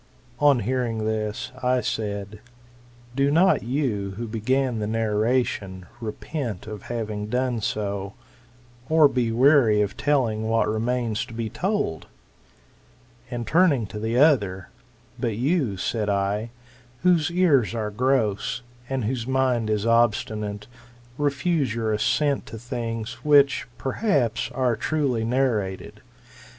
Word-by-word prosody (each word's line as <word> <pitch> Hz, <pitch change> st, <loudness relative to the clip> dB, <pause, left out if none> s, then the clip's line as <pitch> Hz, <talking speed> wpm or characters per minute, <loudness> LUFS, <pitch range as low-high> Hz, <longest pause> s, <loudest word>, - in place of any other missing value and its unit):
^ -, -, -6 dB
On 140 Hz, -4 st, +5 dB
hearing 115 Hz, -1 st, -1 dB
this, 110 Hz, -1 st, -2 dB
I 125 Hz, 0 st, +2 dB
said, 100 Hz, -2 st, -4 dB, 0.8 s
Do 140 Hz, +1 st, +2 dB
not 175 Hz, +6 st, +4 dB
you, 115 Hz, -7 st, -2 dB
who 115 Hz, 0 st, -4 dB
began 120 Hz, +2 st, 0 dB
the 105 Hz, -, -2 dB
narration, 110 Hz, -3 st, 0 dB
repent 115 Hz, -, -5 dB
of 105 Hz, -2 st, -7 dB
having 105 Hz, -3 st, -3 dB
done 125 Hz, 0 st, -1 dB
so, 100 Hz, -1 st, -3 dB, 0.7 s
or 160 Hz, -1 st, +6 dB
be 125 Hz, -4 st, 0 dB
weary 125 Hz, -3 st, +5 dB
of 100 Hz, -1 st, -4 dB
telling 115 Hz, -7 st, 0 dB
what 115 Hz, -1 st, +2 dB
remains 115 Hz, 0 st, -1 dB
to 115 Hz, -, -10 dB
be 115 Hz, -1 st, -3 dB
told 190 Hz, -, -2 dB, 1.2 s
l,;#l\nd 120 Hz, -2 st, -4 dB
turning 155 Hz, -, +3 dB
to 105 Hz, +1 st, -7 dB
the 110 Hz, +2 st, -1 dB
other; 105 Hz, -, +3 dB, 0.5 s
But 115 Hz, -4 st, -1 dB
you, 130 Hz, -, 0 dB
said 105 Hz, +2 st, -1 dB
I, 100 Hz, +3 st, 0 dB, 0.5 s
whose 175 Hz, -3 st, +3 dB
ears 155 Hz, -, +3 dB
are 105 Hz, -2 st, -2 dB
gross, 125 Hz, 0 st, 0 dB, 0.3 s
and 135 Hz, -4 st, -1 dB
whose 120 Hz, 0 st, -2 dB
mind 130 Hz, -4 st, +1 dB
is 105 Hz, 0 st, 0 dB
obstinate, 110 Hz, -3 st, +1 dB, 0.5 s
refuse 145 Hz, -3 st, 0 dB
your 110 Hz, -2 st, -1 dB
assent 130 Hz, +6 st, +1 dB
to 115 Hz, -, -8 dB
things 115 Hz, -1 st, -5 dB
which, 145 Hz, -3 st, +4 dB
perhaps, 135 Hz, -, 0 dB
are 125 Hz, -3 st, 0 dB
truly 130 Hz, -2 st, 0 dB
narrated. 115 Hz, -6 st, -1 dB
115 Hz, 125 wpm, -24 LUFS, 105-135 Hz, 1.2 s, or